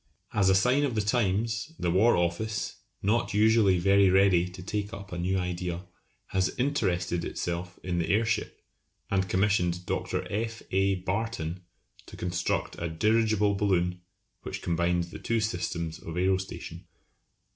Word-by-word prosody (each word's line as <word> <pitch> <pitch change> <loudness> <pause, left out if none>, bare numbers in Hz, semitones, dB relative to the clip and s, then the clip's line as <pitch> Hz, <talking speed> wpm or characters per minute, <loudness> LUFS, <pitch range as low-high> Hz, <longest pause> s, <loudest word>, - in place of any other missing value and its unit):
As 100 -2 +3
a 95 - +5
sign 125 +8 +3
of 135 -5 0
the 110 - +2
times, 110 +5 0
the 85 - 0
War 110 +7 +5
Office, 85 +6 -1 0.3
not 105 0 +1
usually 105 -3 +5
very 100 +2 +5
ready 95 -2 +4
to 90 0 -10
take 105 +2 -3
up 100 -3 -8
a 90 - -4
new 95 +2 0
idea, 90 0 -3 0.4
has 95 0 0
interested 90 -11 0
itself 85 +1 -4
in 90 -1 -1
the 85 - -1
airship, 110 +1 0 0.5
and 95 -1 +1
commissioned 90 -2 +1
Dr. - - -2
F. 110 +2 -3
A. 95 +1 +2
Barton 95 -2 -3 0.5
to - - -11
construct 90 0 -2
a 85 - -1
dirigible 105 +3 +2
balloon 90 -3 +1 0.4
which - - -6
combines 85 0 0
the - - -8
two 115 0 0
systems 85 -7 -2
of 80 - -7
aerostation. 95 +1 -2
95 Hz, 145 wpm, -28 LUFS, 90-105 Hz, 0.5 s, a